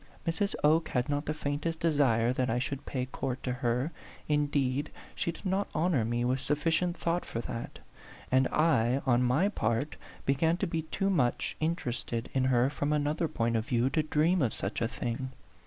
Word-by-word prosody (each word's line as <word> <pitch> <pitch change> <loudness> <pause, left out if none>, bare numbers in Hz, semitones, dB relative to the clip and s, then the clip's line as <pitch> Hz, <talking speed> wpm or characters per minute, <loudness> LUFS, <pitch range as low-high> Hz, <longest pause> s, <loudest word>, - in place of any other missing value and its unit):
Mrs. 170 +5 0
Oke 155 +2 +4
had 125 +1 0
not 145 +1 -1
the 155 - 0
faintest 150 +2 -2
desire 130 -7 +3
that 130 -1 0
I 115 - +1
should 135 +2 -3
pay 130 -2 -2
court 130 0 -4
to 125 - -1
her, 125 +4 0 0.4
indeed 145 -1 +1 0.2
she 170 - -1
did 170 - -14
not 190 +2 +1
honor 160 -8 +2
me 120 +2 0
with 130 +2 +1
sufficient 160 +5 0
thought 170 +1 0
for 115 - -5
that; 115 0 -6 0.5
and 130 0 +4
I, 135 -5 +2
on 125 -2 +4
my 130 +10 +3
part, 145 - -1 0.3
began 160 +5 +2
to 195 - 0
be 165 -2 -1
too 195 +5 -1
much 130 -10 +1
interested 125 -7 -2
in 130 -1 +2
her 130 +1 +3
from 145 0 -1
another 150 +2 +1
point 115 -4 0
of 110 +1 -1
view 125 0 +2
to 155 - +2
dream 155 +4 +2
of 120 -5 +1
such 100 +4 -3
a 115 - +2
thing. 120 +3 -4
140 Hz, 190 wpm, -30 LUFS, 125-160 Hz, 0.5 s, Oke